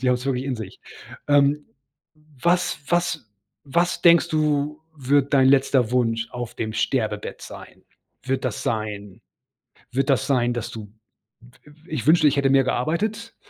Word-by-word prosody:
die 130 - +2
haben 125 - +4
es 125 +2 -5
wirklich 130 -1 -1
in 135 -3 -3
sich. 110 -4 -9 0.5
Ähm. 145 +1 +3 0.8
„Was 180 +1 +1
was 170 -9 -1 0.3
was 170 +6 0
denkst 170 -1 +5
du, 150 -1 0 0.2
wird 140 +1 +1
dein 130 -1 +5
letzter 135 -3 +3
Wunsch 115 -2 0
auf 120 -1 -6
dem 110 -1 -4
Sterbebett 110 -2 -2
sein? - - -12 0.4
Wird 135 0 -2
das 120 - -3
sein 105 -3 -4 0.7
wird 135 +3 -1
das 130 -5 +2
sein, 120 -3 +1
dass 120 -1 -4
du, 105 -3 -9 0.7
i 150 - -16 0.2
ich 155 -8 -4
wünschte, 155 -1 +5
ich 145 - +2
hätte 135 -1 +2
mehr 135 -1 +4
gearbeitet? 210 - -2
135 Hz, 155 wpm, -23 LUFS, 120-150 Hz, 0.8 s, denkst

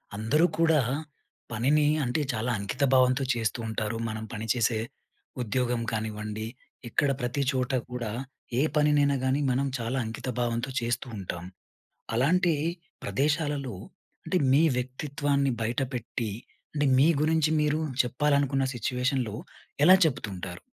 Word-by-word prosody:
అందరూ 140 +11 +3
కూడా, 160 -2 +4 0.7
పనిని 140 +7 +3 0.2
అంటే 125 +4 0
చాలా 115 +2 -1
అంకిత 100 +7 -2
భావంతో 130 +1 +4
చేస్తూ 115 0 -1
ఉంటారు. 110 0 -2
మనం 110 0 -4
పని 110 0 -4
చేసే 115 -2 +1 0.6
ఉద్యోగం 120 +1 0
కానివ్వండి, 110 -1 -3 0.4
ఇక్కడ 140 +5 +2
ప్రతి 125 +3 -1
చోటా 130 -1 0
కూడా, 120 -3 -3 0.5
ఏ - - +4
పనినైనా 145 -1 +4
గానీ 130 +2 +2
మనం 135 +2 +1
చాలా 120 +3 -2
అంకితభావంతో 120 +2 -2
చేస్తూ 120 +3 -2
ఉంటాం. 85 -3 -5 0.7
అలాంటి 165 +8 +3 0.5
ప్రదేశాలలో, 145 -4 0 0.5
అంటే 185 - +1
మీ 145 +4 +5
వ్యక్తిత్వాన్ని 140 +1 0
బయటపెట్టి, 120 -2 -2 0.4
అంటే, 145 0 +2
మీ 140 - +6
గురించి 160 0 +3
మీరు 150 +1 +1 0.2
చెప్పాలనుకున్న 140 +2 +1
సిట్యుయేషన్‌లో 125 -2 -1 0.5
ఎలా 185 +5 +9
చెప్తుంటారు? 95 - -3
125 Hz, 115 wpm, -28 LUFS, 115-145 Hz, 0.7 s, ఎలా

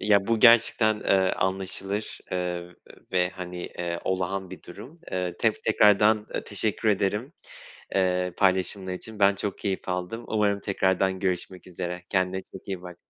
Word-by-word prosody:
ya, 100 -2 +3
bu 115 -1 +1
gerçekten, 115 -2 +5
eee, 95 -1 +3
anlaşılır. 95 +2 -2
Iıı, 90 -1 -3 0.4
ve, 90 -1 +3
hani, 90 -1 -7
eee, 85 -1 -4
olağan 95 0 -2
bir 95 - -10
durum, 125 - -12
eee, 90 -1 -2
tef 110 -2 +2
eee, - - -24
tekrardan 105 0 +4 0.2
teşekkür 105 +1 0
ederim, 105 - 0 0.6
eee, 90 -1 +1
paylaşımlar 95 0 +1
için. 110 +3 -7
Ben 100 0 +5
çok 100 0 -4
keyif 95 -2 -3
aldım. 90 +6 -3
Umarım 105 -2 +1
tekrardan 95 -1 +1
görüşmek 90 -1 -3
üzere. 90 0 -5
Kendine 95 0 0
çok 95 - -11
iyi 95 -2 -4
bak. 90 -1 -9
95 Hz, 150 wpm, -26 LUFS, 90-105 Hz, 0.6 s, gerçekten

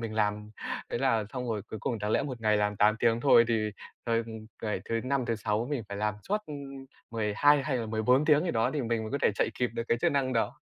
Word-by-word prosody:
mình 115 -2 -4
làm. 105 0 -1 0.4
Thế - - -1
là 115 -4 +2
xong 125 -2 -4
rồi 110 -3 -2
cuối 110 - -7
cùng 115 +1 -2
đáng 105 0 -2
lẽ - - +2
một 130 -4 -5
ngày 110 -1 +3
làm 105 0 0
8 105 +2 +4
tiếng 115 0 +2
thôi 120 -3 +6
thì, 110 -2 +1 0.3
ờ, 115 -1 +1
ừm, 110 -1 -4 0.2
ngày 105 -4 -2
thứ 115 0 -1
Năm, 135 0 0
thứ 115 - 0
Sáu 105 +2 -1
mình 140 -5 -1
phải 100 - -5
làm 105 +1 0
suốt, 210 - +2
ưm, 140 -2 -8 0.3
12 115 +6 +3
hay 135 -2 -1
là 115 -2 -3
14 115 +6 +2
tiếng 150 +1 +4
gì 175 - 0
đó 115 -1 +1
thì 145 - 0
mình 115 -1 -1
mới 110 - -5
có 140 - 0
thể - - +5
chạy - - +1
kịp 125 -1 +1
được 115 - -1
cái 115 - +2
chức 170 - +2
năng 135 -2 +1
đó. 115 0 +1
115 Hz, 270 wpm, -29 LUFS, 110-135 Hz, 0.4 s, thôi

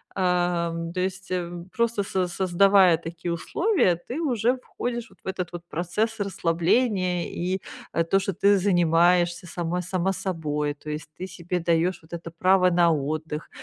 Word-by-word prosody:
Ам, 175 -2 0
то 185 - -3
есть, 190 0 -3
э, 180 -2 -2 0.2
просто 235 -2 +1
со 185 -2 -1
создавая 185 0 +4
такие 170 +1 -5
условия, 330 - +1
ты 255 +6 -4
уже 245 -3 +1
входишь 240 -1 -5
вот - - -22
в - - -12
этот 180 -2 -3
вот 175 -1 -7
процесс 215 +7 -1
расслабления 180 0 +1
и, 185 +2 -2 0.3
э, 165 - +2
то, 195 +4 +3
что 195 0 -2
ты 200 +2 +4
занимаешься 175 -1 +3
сама 175 +1 -2
сама 185 +1 -1
собой. 155 -6 -2
То 150 +1 -11
есть 150 0 -5
ты 185 - -5
себе 180 0 -3
даёшь 170 +2 +1
вот 165 +1 -16
это 165 -1 -6
право 185 +2 +4
на 170 -1 +4
отдых. 155 +1 -3
180 Hz, 165 wpm, -25 LUFS, 170-195 Hz, 0.3 s, создавая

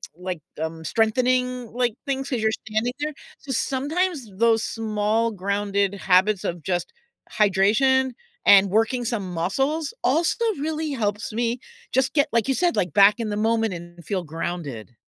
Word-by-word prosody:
like, 180 -1 -5 0.2
um, 160 0 -4
strengthening, 250 +5 +1
like, 245 -3 0
things, 270 -1 -2
'cause 250 -4 -1
you're 220 - +3
standing 220 +3 -2
there." 300 0 -2 0.3
So, 275 - -7
sometimes 285 - -1
those 225 +1 +3
small 220 +1 0
grounded 200 0 -1
habits 190 +1 +3
of 170 -1 -3
just 175 - -2 0.4
hydration 220 +7 +3 0.3
and 200 0 +7
working 225 +5 +1
some 200 -6 -3
muscles 270 - -1
also 325 - +2
really 310 0 -2
helps 215 -4 -2
me 235 +1 -1 0.3
just 265 0 +1
get, 290 0 +3
like 230 -2 +1
you 270 - +2
said, 350 +5 +1
like, 175 -5 0
back 205 +2 +6
in 225 -2 -2
the 205 - -2
moment 225 -3 +1
and 175 -1 -10
feel 190 -3 -2
grounded. 150 -8 -5
220 Hz, 155 wpm, -24 LUFS, 195-260 Hz, 0.4 s, and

